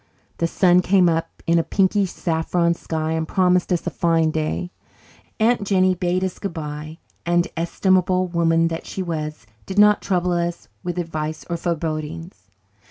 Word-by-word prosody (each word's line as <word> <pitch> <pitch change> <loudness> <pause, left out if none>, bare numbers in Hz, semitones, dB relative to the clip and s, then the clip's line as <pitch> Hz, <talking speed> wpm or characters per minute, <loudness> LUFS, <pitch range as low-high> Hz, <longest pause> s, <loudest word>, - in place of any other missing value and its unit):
The 170 - +2
sun 180 +1 +4
came 185 0 +4
up 165 -1 -2
in 170 0 +3
a - - +1
pinky 195 +4 +2
saffron 170 0 0
sky 160 -1 -3
and 160 0 -1
promised 180 0 +2
us 175 - 0
a - - -2
fine 165 -2 +2
day. 160 +3 -2 0.7
Aunt 230 0 +3
Jennie 185 -2 +3
bade 180 +1 -1
us 190 -2 -3
goodbye 155 -4 -6 0.3
and, 175 0 +2
estimable 185 +2 +1
woman 165 -1 +2
that 165 0 -5
she 190 - -4
was, 155 -5 -4 0.2
did 190 - -6
not 210 0 +6
trouble 180 -2 0
us 170 0 -2 0.2
with 175 0 -4
advice 155 -2 -4
or - - +1
forebodings. 165 0 -4
170 Hz, 160 wpm, -22 LUFS, 160-185 Hz, 0.7 s, not